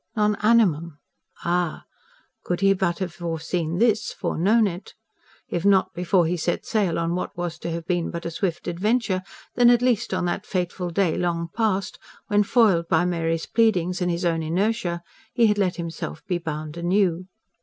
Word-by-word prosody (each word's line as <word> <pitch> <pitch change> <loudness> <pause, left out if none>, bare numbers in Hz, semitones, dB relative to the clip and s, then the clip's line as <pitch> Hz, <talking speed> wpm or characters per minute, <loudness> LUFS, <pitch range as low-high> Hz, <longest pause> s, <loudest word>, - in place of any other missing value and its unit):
"Non 210 -1 +2
animum"? 175 -9 +3 0.5
Ah! 175 -1 0 0.6
could 175 +1 -2
he 195 0 +5
but 185 -3 0
have 180 -4 -4
foreseen 170 0 -3
this 220 0 +2
foreknown 215 +7 +2
it. 180 -1 -5 0.5
If 175 - -3
not 190 -1 +3
before 180 0 +2
he 175 +2 0
set 175 +1 -2
sail 210 -9 0
on 170 0 -1
what 180 0 -4
was 175 -1 -4
to - - -4
have 165 0 -4
been 175 -2 -1
but 170 -1 -6
a 170 - -3
swift 175 +1 -3
adventure, 195 +2 0 0.3
then 245 -1 +5
at 240 0 +4
least 240 -3 +1
on 185 -1 0
that 175 +3 -2
fateful 180 -1 -2
day 170 -1 +1
long 170 -1 -1
past 205 -4 -1 0.3
when, 205 -1 +4
foiled 200 -6 +3
by 165 +2 +2
Mary's 165 -2 -1
pleadings 185 -5 +1
and 180 - +1
his 175 +1 -1
own 165 -1 +1
inertia, 175 +1 -1 0.3
he 235 - +4
had 210 -1 +2
let 185 -3 +1
himself 170 -2 -6
be 180 -2 -1
bound 155 -1 -5
anew. 180 0 +1
180 Hz, 175 wpm, -24 LUFS, 170-200 Hz, 0.6 s, he